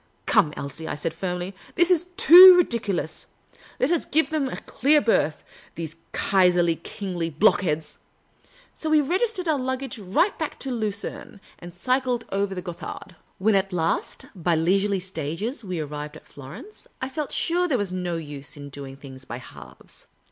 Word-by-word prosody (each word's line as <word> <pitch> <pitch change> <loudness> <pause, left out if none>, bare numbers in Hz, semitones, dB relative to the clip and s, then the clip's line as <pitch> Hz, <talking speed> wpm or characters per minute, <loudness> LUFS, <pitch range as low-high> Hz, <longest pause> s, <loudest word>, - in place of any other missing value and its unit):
" - - -41
Come, 150 - +3
Elsie," 150 +3 -6
I - - -3
said, 155 +2 -3
firmly, 180 +2 -4
" - - -23
this 350 +1 +3
is 350 -1 +3
too 370 -3 +11
ridiculous. 210 - -1 0.5
Let 260 - +2
us 345 - +1
give 315 +2 +1
them 295 -4 0
a - - -5
clear 295 +4 +2
berth, 190 - +1 0.3
the.se 160 -1 -5 0.2
Kaiserly 180 -3 +3
Kingly 175 -3 -4
block 180 +7 +3
heads! 155 -4 -2 0.4
" - - -30
So 315 - -5
we 310 0 +5
registered 370 - 0
our 305 -3 +2
luggage 260 -1 -4
right 205 - +1
back 315 - -3
to 270 - -3
Lu 220 -3 -1
cerne, 200 0 -7 0.2
and 175 0 -11
cycled 250 +3 0
over 195 0 -1
the 180 - -5
Gothard. 175 0 -8 0.2
When 215 +3 +2
at 195 0 +1
last, 165 -2 -1
by 175 -2 0
leisurely 195 +5 +1
stages, 185 - -4
we 185 -4 -4
arrived 150 0 -6
at - - -18
Florence, 170 - -11
I 260 - -3
felt 275 +1 -4 0.4
there 265 - +2
was 205 -4 -2
no 180 -2 -3
use 145 -2 -8
in 145 0 -9
doing 135 -1 -9
things 130 -2 -12
bj' 120 - -6
halves. 130 - -14
195 Hz, 175 wpm, -24 LUFS, 165-265 Hz, 0.5 s, too